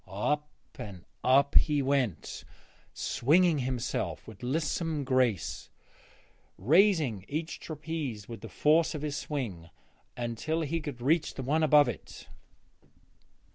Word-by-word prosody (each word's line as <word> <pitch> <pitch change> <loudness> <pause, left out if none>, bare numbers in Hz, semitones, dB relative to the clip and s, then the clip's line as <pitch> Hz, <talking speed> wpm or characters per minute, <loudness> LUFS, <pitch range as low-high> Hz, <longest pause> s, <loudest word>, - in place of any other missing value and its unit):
Up 150 +10 -1 0.3
and 95 -4 -8 0.2
up 140 +2 +4
he 145 -2 +4
went, 130 - -1 0.5
swinging 160 +4 +2
himself 125 -2 -3
with - - -12
lissome 155 +3 -1
grace, 130 - 0 0.9
raising 150 - +3
each 160 +3 -4
trapeze 150 -9 -5
with 115 -3 -8
the 115 - -8
force 155 - +3
of 150 - -5
his 150 -2 -2
swing 110 - -4 0.5
until 120 +7 -2
he 160 +2 -2
could 140 -5 -6
reach 155 +3 +2
the 135 - -5
one 150 +5 +1
above 150 -2 +6
it. 110 -10 -7
140 Hz, 120 wpm, -29 LUFS, 120-155 Hz, 0.9 s, above